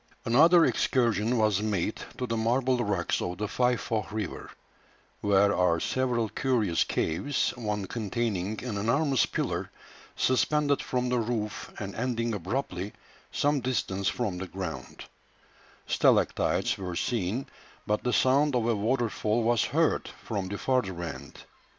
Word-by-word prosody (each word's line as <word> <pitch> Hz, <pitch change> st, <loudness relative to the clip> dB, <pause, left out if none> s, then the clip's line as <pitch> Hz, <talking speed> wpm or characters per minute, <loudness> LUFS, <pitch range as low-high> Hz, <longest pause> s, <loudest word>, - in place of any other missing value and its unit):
Another 165 Hz, +8 st, +6 dB
excursion 120 Hz, -2 st, +1 dB
was 105 Hz, -3 st, +2 dB
made 105 Hz, -1 st, -1 dB, 0.2 s
to 125 Hz, -, -2 dB
the 115 Hz, -1 st, -2 dB
marble 125 Hz, +3 st, +1 dB
rocks 100 Hz, -6 st, 0 dB
of 90 Hz, 0 st, -3 dB
the 105 Hz, +2 st, -2 dB
Faifoh 120 Hz, -1 st, 0 dB
River, 105 Hz, -4 st, -4 dB, 0.7 s
where 100 Hz, 0 st, +3 dB
are 85 Hz, -2 st, +2 dB
several 120 Hz, +1 st, 0 dB
curious 110 Hz, -7 st, +1 dB
caves, 125 Hz, -, 0 dB
one 105 Hz, -4 st, -3 dB
containing 110 Hz, -2 st, -2 dB
an 115 Hz, -5 st, -3 dB
enormous 135 Hz, +5 st, +2 dB
pillar -, -, -2 dB, 0.5 s
suspended 145 Hz, +2 st, +2 dB
from 125 Hz, -1 st, -1 dB
the 125 Hz, -1 st, +1 dB
roof 110 Hz, -2 st, -3 dB
and 100 Hz, -1 st, -5 dB
ending 115 Hz, -1 st, -1 dB
abruptly 100 Hz, -1 st, -3 dB, 0.4 s
some 145 Hz, 0 st, +1 dB
distance 100 Hz, -6 st, -1 dB
from 100 Hz, -7 st, -1 dB
the 95 Hz, -, -5 dB
ground; 95 Hz, -2 st, -6 dB, 0.8 s
stalactites -, -, +2 dB
were 90 Hz, -2 st, -4 dB
seen, 115 Hz, +4 st, -1 dB, 0.4 s
but 105 Hz, 0 st, 0 dB
the 125 Hz, -, +1 dB
sound 135 Hz, +3 st, +3 dB
of 120 Hz, -2 st, +1 dB
a 115 Hz, -, +2 dB
water 120 Hz, +4 st, +1 dB
fall 110 Hz, +1 st, 0 dB
was 120 Hz, 0 st, +2 dB
heard 160 Hz, +1 st, +1 dB, 0.2 s
from 100 Hz, -4 st, -2 dB
the 100 Hz, +2 st, -4 dB
further 100 Hz, -10 st, 0 dB
end. 70 Hz, -4 st, -8 dB
115 Hz, 140 wpm, -28 LUFS, 100-125 Hz, 0.8 s, Another